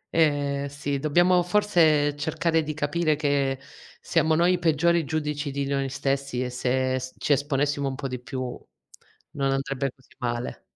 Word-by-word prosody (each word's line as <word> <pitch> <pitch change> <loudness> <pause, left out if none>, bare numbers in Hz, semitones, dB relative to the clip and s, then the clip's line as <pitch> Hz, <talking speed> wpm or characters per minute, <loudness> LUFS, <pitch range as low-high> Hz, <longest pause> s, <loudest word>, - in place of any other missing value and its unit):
Ehm, 145 -3 +2
sì 140 0 -3
dobbiamo 175 +5 +4
forse 170 -6 +3
cercare 160 +2 0
di 155 -1 -4
capire 155 +1 +1
che 140 -3 0 0.4
siamo 160 0 +2
noi 175 +2 +4
i 180 - 0
peggiori 170 0 +2
giudici 150 0 -2
di 140 0 -2
noi 135 -1 -1
stessi 135 -1 -1
e 125 - -4
se 130 +1 0
s 130 0 -8
ci 145 - +2
esponessimo 145 0 0
un 135 - -3
po' 135 - -4
di 125 -1 -5
più 130 +1 -6 0.9
non 135 -1 -1
andrebbe 135 0 -1
così 130 0 -26
male. 120 -1 -3
145 Hz, 160 wpm, -25 LUFS, 135-155 Hz, 0.9 s, dobbiamo